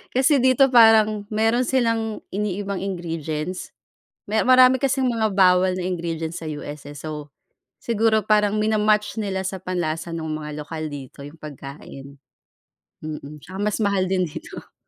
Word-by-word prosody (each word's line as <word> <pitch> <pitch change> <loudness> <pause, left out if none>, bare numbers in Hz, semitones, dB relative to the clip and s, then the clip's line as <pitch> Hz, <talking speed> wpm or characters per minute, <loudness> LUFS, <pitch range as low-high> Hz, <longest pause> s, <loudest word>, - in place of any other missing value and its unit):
Kasi 270 +3 +4
dito 260 +1 +4
parang 220 -3 +5
meron 225 +3 +1
silang 230 -4 0
iniibang 200 -1 -2
ingredients. 170 -2 -4 0.5
Me 220 +2 +1
marami 255 0 +6
kasing 265 -1 +1
mga 225 -2 +1
bawal 185 -1 +4
na 180 - -3
ingredients 170 -2 -3
sa - - -6
US, 145 -1 -7
eh. 145 - -10
So, 150 0 -7 0.5
siguro 220 -2 +1
parang 210 -1 +3
mina-match 215 0 +1
nila 190 -2 -3
sa 190 -1 -5
panlasa 170 -2 -3
nung 160 -2 -4
mga 150 -1 -6
lokal 155 0 -5
dito 140 -1 -9
yung 145 +3 -11
pagkain, 140 -1 -10 0.9
mm. 150 -1 -7
Tsaka 185 - -9
mas 210 0 0
mahal 200 -3 +1
din 185 -1 +1
dito. 155 - -10
190 Hz, 145 wpm, -23 LUFS, 155-220 Hz, 0.9 s, marami